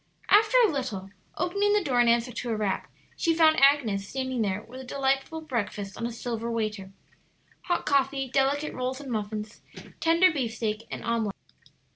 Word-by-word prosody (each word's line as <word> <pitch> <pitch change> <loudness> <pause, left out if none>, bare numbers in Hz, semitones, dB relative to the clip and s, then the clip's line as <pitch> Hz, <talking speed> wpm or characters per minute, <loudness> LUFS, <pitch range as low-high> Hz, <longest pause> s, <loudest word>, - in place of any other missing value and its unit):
After 435 +4 +6
a 410 - +1
little, 220 -9 -4 0.3
opening 400 +4 +1
the 420 -2 +2
door 255 -6 +1
in 240 - +3
answer 235 +1 +2
to 240 +1 -5
a 225 - 0
rap, 210 -3 -1 0.3
she 330 -2 +1
found 315 -3 +5
Agnes 240 -9 +4
standing 260 -2 -2
there 205 0 -1
with 255 +3 -10
a - - -9
delightful 270 +4 -1
breakfast 210 -8 -4
on 230 - -3
a - - -5
silver 230 0 -4
waiter 215 -4 -3 0.7
hot 350 - 0
coffee, 275 -1 +1
delicate 275 +3 +1
rolls 255 +1 -3
and 275 -3 -7
muffins, 210 0 -4 0.4
tender 335 +3 +4
beefsteak, 225 -4 -3
and - - -6
omelet. 225 -4 -1
250 Hz, 170 wpm, -27 LUFS, 220-285 Hz, 0.7 s, After